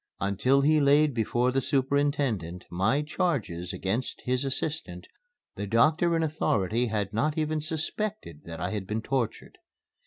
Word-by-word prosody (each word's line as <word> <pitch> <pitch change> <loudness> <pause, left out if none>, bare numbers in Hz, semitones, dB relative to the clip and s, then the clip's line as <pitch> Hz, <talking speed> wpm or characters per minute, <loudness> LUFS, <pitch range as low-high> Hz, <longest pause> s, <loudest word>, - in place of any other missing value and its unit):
Until 105 +8 +2
he 155 +2 +4
laid 145 +1 +4
before 120 +2 +1
the 135 +1 +1
superintendent 135 - 0
my 110 +11 +1
charges 140 - -2
against 110 +7 -3
his 130 +1 0
assistant, 135 - -2 0.5
the 100 - -4
doctor 155 - +3
in 165 - +1
authority 120 - 0
had 105 -2 -2
not 150 +8 0
even 155 0 0
suspected 160 - -4
that 80 0 -7
I 90 +2 -2
had 100 -3 -4
been 110 +2 -2
tortured. 130 -4 -3
130 Hz, 145 wpm, -28 LUFS, 100-150 Hz, 0.5 s, he